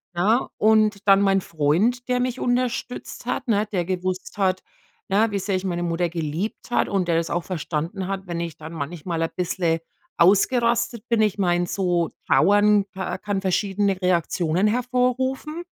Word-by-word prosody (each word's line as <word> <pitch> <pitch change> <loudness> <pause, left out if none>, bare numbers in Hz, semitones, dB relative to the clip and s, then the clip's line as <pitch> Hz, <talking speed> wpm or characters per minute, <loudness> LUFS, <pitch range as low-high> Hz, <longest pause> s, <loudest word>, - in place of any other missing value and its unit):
ne, 215 +8 +2
und 215 -2 +3
dann 195 0 +6
mein 195 -1 +3
Freund, 180 - 0
der 250 0 +1
mich 250 0 -2
unterstützt 245 0 -2
hat, 255 +1 -3
ne? 210 0 +2
Der 175 -2 +1
gewusst 185 +2 -3
hat, 185 -1 +1 0.5
ja, 210 +3 +2
wie 200 - -1
sehr 195 0 -1
ich 190 - -5
meine 175 -1 -2
Mutter 170 +1 0
geliebt 170 +8 -4
habe - - +1
und 180 -3 0
der 165 - +3
das 165 - -1
auch 175 - -1
verstanden 180 +2 -3
hat, 195 -1 -4
wenn 170 -1 -3
ich 170 -2 -4
dann 160 +1 -10
manchmal 165 +2 -4
ein 165 - -1
bisschen 175 -2 0 0.4
ausgerastet 235 +4 +3
bin. 230 -2 +3
Ich 210 -2 +1
meine, 175 -2 +1
so 175 -3 0 0.2
trauern 205 +3 +4
ka 190 0 -4
kann 200 0 -3
verschiedene 195 0 0
Reaktionen 175 0 +1
hervorrufen, 255 +6 -1
195 Hz, 165 wpm, -23 LUFS, 175-220 Hz, 0.5 s, dann